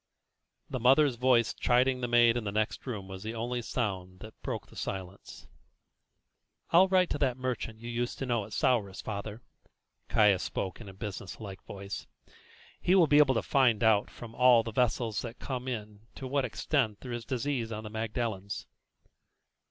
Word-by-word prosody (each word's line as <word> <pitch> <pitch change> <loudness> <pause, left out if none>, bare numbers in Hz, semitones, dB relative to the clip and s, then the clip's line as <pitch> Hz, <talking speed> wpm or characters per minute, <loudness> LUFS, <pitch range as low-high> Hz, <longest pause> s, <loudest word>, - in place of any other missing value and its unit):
The 130 - -4
mother's 135 +2 +5
voice 120 -1 +3
chiding 125 +1 +2
the 120 - -1
maid 120 -1 +5
in 120 - -1
the 100 - -3
next 110 +5 -2
room 105 -6 -4
was 95 0 -8
the 110 +2 -5
only 120 +2 -2
sound 95 -6 -3
that 110 0 -12
broke - - -4
the - - -18
silence. 95 0 -6 1.3
"I'll 180 +3 +7
write 185 -1 +3
to - - -1
that 130 -3 +1
merchant 120 -3 -4
you 120 - -7
used 120 +1 -2
to 135 - -3
know 120 -4 0
at 105 - -14
Souris, 100 -4 +1
father," 105 +1 -5 0.7
Caius 105 -4 +4
spoke 95 +3 -4
in 105 - -9
a - - -10
business 100 -1 -6
like 100 -4 -8
voice. 100 0 -7 0.7
"He 180 - +3
will 180 -3 +7
be 150 -1 +5
able 135 -3 +5
to - - 0
find 120 -5 +3
out 110 -2 +4
from 115 -1 -10
all 125 -2 +6
the 115 - -5
vessels 115 -2 0
that 115 0 -7
come 130 -1 -5
in 105 -4 -5 0.2
to 135 - -7
what 135 0 0
extent 115 -3 -1
there 125 - -7
is 120 -1 -4
disease 125 -1 -2
on 110 0 -5
the 105 - -8
Magdalens." 110 -3 -3
115 Hz, 185 wpm, -30 LUFS, 105-125 Hz, 1.3 s, I'll